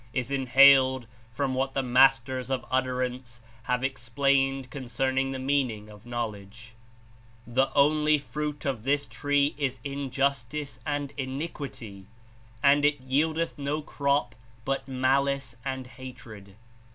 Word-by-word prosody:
Is 130 +1 -2
Inhaled 130 -1 +5 0.3
from 135 +2 -1
what 135 +1 -1
the 135 - +1
Masters 130 0 +3
of 130 -2 -2
Utter 130 0 +1
ance 125 -1 -6 0.3
have 125 0 0
explained 135 +1 0
concerning 135 0 -1
the 135 - -3
meaning 130 -6 -1
of 105 +2 -14
Knowl 120 -3 -2
edge. 110 +3 -14 0.7
The 130 +3 +1
only 150 +1 +4
fruit 150 +1 -5
of 130 -6 -2
this 145 +2 +1
tree 145 0 +1
is 135 -3 -1
injustice 140 -1 -2
and 145 -1 -2
Iniquity, 130 - -6 0.6
and 140 +1 +5
it 145 -1 +3
yieldeth 155 +5 0
no 145 +2 -2
crop 140 -4 0 0.3
but 135 0 -2
malice 135 -1 0
and 130 -1 -4
hatred. 115 -6 -11
135 Hz, 125 wpm, -27 LUFS, 125-140 Hz, 0.7 s, Inhaled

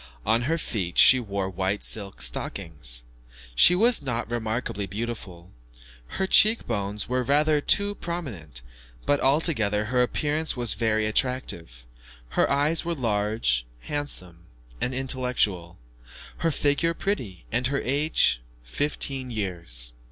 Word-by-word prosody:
On 115 +1 +2
her 165 - +2
feet 95 - -3
she 130 - +8
wore 100 -4 -3
white 95 +2 -2
silk 100 - -4
stockings. - - -3 0.5
She 170 - +6
was 230 +2 +5
not 120 -4 -3
remarkably 110 -3 -2
beautiful; 100 -4 -6 0.7
her 190 - +1
cheek 215 +4 +5
bones 100 -2 -2
were 125 +1 0
rather 150 +4 +2
too 200 +6 +3
prominent; 110 - -6 0.4
but 145 0 +2
altogether 130 - +1
her 125 +3 +1
appearance 150 +4 0
was 120 -3 +2
very 110 0 0
attractive. 105 - -1 0.4
Her 65 - +1
eyes 145 +4 +2
were 170 0 -2
large, 105 - 0 0.2
handsome, 90 - -3 0.4
and 125 - -1
intellectual, 125 -10 0 0.6
her 165 - +1
figure 150 +3 +1
pretty, 120 - -3
and 120 +2 +1
her 140 +1 -1
age 135 - +2 0.2
fifteen 135 - -1
years. 85 - -4
115 Hz, 125 wpm, -25 LUFS, 95-145 Hz, 0.7 s, she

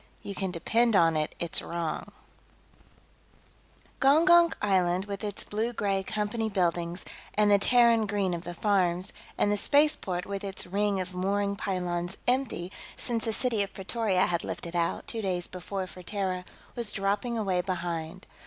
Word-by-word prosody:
You 200 - -5
Can 190 0 -2
Depend 225 +7 +2
on 165 -3 +5
It 155 0 -1
It's 170 - 0
Wrong 170 -2 -4 1.9
Gongonk 335 +5 +6
Island, 185 -2 +2
with 200 0 -6
its 205 -2 -3
blue 225 +3 -2
gray 195 -3 0
Company 215 +3 -2
buildings, 175 -2 -1 0.3
and 210 0 +4
the 200 - +6
Terran 235 0 +5
green 200 -3 0
of 170 - -3
the 175 0 -6
farms, 185 -2 +1 0.2
and 205 - +2
the 205 - +1
spaceport 285 -9 +2
with 200 0 -4
its 195 -1 -3
ring 200 +1 0
of 185 0 -4
mooring 200 +2 0
pylons 180 -2 -2
empty 245 -8 0 0.3
since 230 -2 -2
the 225 - 0
City 230 -2 +1
of 200 - -3
Pretoria 195 -1 0
had 170 -1 -1
lifted 170 +1 -5
out, 170 -1 0
two 225 - -3
days 180 -3 -1
before, 185 +1 -5
for 185 0 -11
Terra, 185 -1 -2 0.3
was 235 -3 0
dropping 205 +4 -1
away 190 -5 +1
behind. 175 -1 -4
195 Hz, 160 wpm, -28 LUFS, 180-215 Hz, 1.9 s, Gongonk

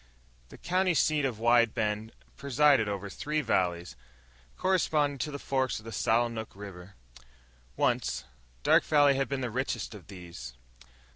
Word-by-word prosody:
The - - -12
county 185 0 +1
seat 150 -1 +2
of 125 -5 -2
Wide 120 0 +3
Bend 110 +1 -1 0.2
presided 140 -4 +3
over 100 0 -4
three 150 +9 -2
valleys, 90 - -1 0.6
corresponding 150 -6 +1
to 155 - -2
the 140 - -5
forks 130 -2 -1
of 110 - -11
the 115 - -7
Sallinook 115 0 0
River. 95 -2 -10 0.8
Once, - - 0 0.4
Dark - - +5
Valley 145 -2 +5
had 135 0 -1
been 140 -1 -2
the 125 -2 -3
richest 130 0 -3
of 100 -6 -12
these. 90 -9 -9
120 Hz, 145 wpm, -29 LUFS, 105-145 Hz, 0.8 s, Dark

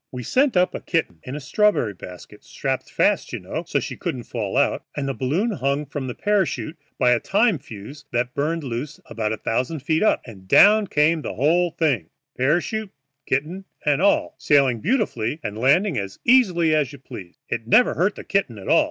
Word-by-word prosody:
We 125 -1 -6
sent 260 - +2
up 180 0 +3
a - - -4
kitten 160 - -2
in 130 - -7
a - - -4
strawberry 150 - +1
basket, 90 -1 -12
strapped - - -3
fast, - - +1
you - - -4
know, - - -5
so - - +1
she - - -5
couldn't 125 - -4
fall 115 -1 -4
out, 140 - +2
and 140 -1 -2
the 135 - -1
basket 170 - -1
hung 140 +2 0
from 140 -1 -5
the 125 - -5
parachute 190 -6 0 0.2
by 125 - +3
a 120 - +3
time 205 - +2
fuse 110 +7 -11
that 120 +1 -1
burned 155 +3 -1
loose 135 +4 -5
about 110 -2 -3
a 110 - -2
thousand 130 +8 -2
feet 155 +3 0
up, 215 - +2
and 95 -6 -13
down 210 - +6
came 155 0 +2
the - - -5
whole 170 +6 +2
thing, 135 - -1 0.3
parachute, 175 - 0 0.4
kitten, 160 +9 -2 0.2
and 145 +1 +2
all, 200 - +2
sailing 135 -5 +3
beautifully 170 - -1
and 105 -1 -4
landing 145 - +3
as 100 0 -6
easily 180 -11 +4
as 150 -4 +1
you 140 - -10
please. 95 -9 -11
It 115 - -4
never 245 - +5
hurt 190 +4 +1
the - - -9
kitten 195 - -1
at 95 - -10
all. - - +5
145 Hz, 200 wpm, -22 LUFS, 120-180 Hz, 0.4 s, down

